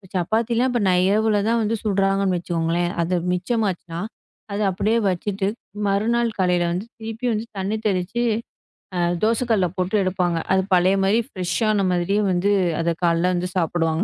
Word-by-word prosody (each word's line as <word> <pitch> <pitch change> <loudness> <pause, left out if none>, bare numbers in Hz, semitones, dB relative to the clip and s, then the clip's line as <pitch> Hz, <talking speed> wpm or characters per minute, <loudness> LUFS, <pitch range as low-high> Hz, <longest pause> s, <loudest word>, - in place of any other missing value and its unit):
சப்பாத்தி 220 +6 0
எல்லாம் 250 +1 +1
நை 180 - +4
இரவுலதான் 215 +2 +2
வந்து 220 +2 0
சுடுறாங்கன்னு 195 -2 +1
வச்சுக்கோங்களேன். 170 0 -1
அது 175 +2 0 0.2
மிச்சம் 215 +5 0
ஆச்சுனா, 170 -2 -6 0.5
அதை 205 +1 -1
அப்படியே 210 +5 +1
வச்சிட்டு, 195 +2 -2 0.4
மறுநாள் 230 +4 +1
காலையில 180 -2 +2
வந்து 180 +5 -3
திருப்பி 225 +2 -6
வந்து 215 +1 -2
தண்ணி 195 +3 -1
தெளிச்சு, 195 +5 -1 1.0
தோசை 230 +3 +2
கல்ல 190 -5 +3
சுட்டு 185 +3 0
எடுப்பாங்க. 180 -2 0
அது 190 0 +3
பழைய 185 +2 +4
மாரி 200 +4 +3
ஃப்ரெஷ்ஷான 195 +2 0
மாதிரியே 180 +4 +1
வந்து, 185 +3 +1 0.3
அதை 170 0 +1
காலைல 170 +2 +2
வந்து 180 +1 -2
சாப்பிடுவாங்க. 165 -1 +1
190 Hz, 145 wpm, -22 LUFS, 175-215 Hz, 1.0 s, நை